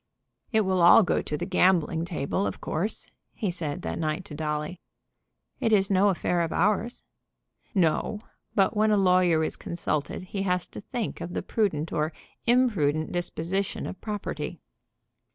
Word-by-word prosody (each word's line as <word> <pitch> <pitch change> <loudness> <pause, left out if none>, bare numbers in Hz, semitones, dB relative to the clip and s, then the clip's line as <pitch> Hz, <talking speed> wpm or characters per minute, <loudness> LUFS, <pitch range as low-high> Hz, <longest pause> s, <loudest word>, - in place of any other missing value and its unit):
"It 220 -2 +4
will 190 -3 +1
all 175 +6 +8
go - - +1
to 150 - -3
the - - -3
gambling 175 -3 +2
table, 170 +3 -1
of - - -5
course," 185 +8 -3 0.2
he 205 -6 -1
said 170 0 -4
that - - -3
night 155 +2 -2
to - - -9
Dolly. 150 +3 -3 0.8
"It 225 - +1
is 200 -2 +3
no 195 +1 +5
affair 175 -2 0
of 165 - -1
ours." 210 +5 +1 0.7
"No; 185 +4 +1 0.4
but 195 +2 +3
when 215 +1 +3
a 210 - +4
lawyer 180 -4 +4
is - - 0
consulted 170 -1 -3
he 195 +2 -4
has 180 -2 0
to - - -8
think 235 +1 -4
of 175 - -5
the - - -2
prudent 165 -8 -1
or 155 0 0 0.3
imprudent 185 - +2
disposition 175 +2 -2
of - - -7
property." 210 -2 -4
180 Hz, 160 wpm, -27 LUFS, 160-200 Hz, 0.8 s, all